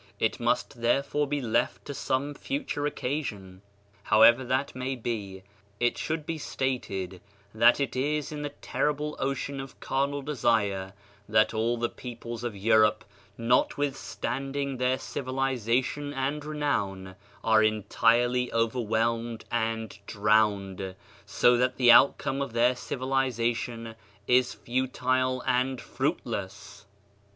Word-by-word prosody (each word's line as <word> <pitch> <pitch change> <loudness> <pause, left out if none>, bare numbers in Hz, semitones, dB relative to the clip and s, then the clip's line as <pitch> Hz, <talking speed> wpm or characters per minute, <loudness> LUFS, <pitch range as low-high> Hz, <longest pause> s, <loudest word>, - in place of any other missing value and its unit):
It - - 0
must 120 - -1
therefore 140 +4 +1
be 145 0 -1
left 115 -3 0
to 145 - -5
some 140 +2 -1
future 265 - -3
occasion. 105 -11 -4 0.4
However 115 +5 +6
that 130 +3 -1
may 130 +1 -3
be, 105 -6 -5 0.4
it 120 0 +2
should 160 -1 -3
be 165 -1 -3
stated 95 -11 -3 0.3
that 115 +4 +5
it 135 -4 -1
is 145 +3 -1
in 150 -1 -5
the 145 - -3
terrible 150 +1 -2
ocean 135 +1 -2
of 135 -1 -9
carnal 140 +1 -1
desire 110 -9 0 0.4
that 110 +1 +3
all 115 +2 0
the 120 0 0
peoples 120 -1 -8
of 120 -3 -3
Europe, 110 +1 +3 0.3
notwithstanding 135 +2 -1
their 125 +1 +1
civilization 130 +1 -1
and 140 +3 -2
renown, 105 -12 -2 0.3
are 110 -1 +5
entirely 120 +3 +2
overwhelmed 115 0 0
and 115 -2 -2
drowned, 100 -3 +1 0.3
so 120 0 +4
that 125 +1 +1
the 125 -2 +7
outcome 140 +2 +5
of 140 -4 -3
their 120 +2 +4
civiliza 130 -2 -1
tion 115 -1 -6 0.3
is 125 +1 +3
futile 130 0 0
and 130 0 +1
fruitless. 100 0 -4
125 Hz, 120 wpm, -28 LUFS, 110-135 Hz, 0.4 s, the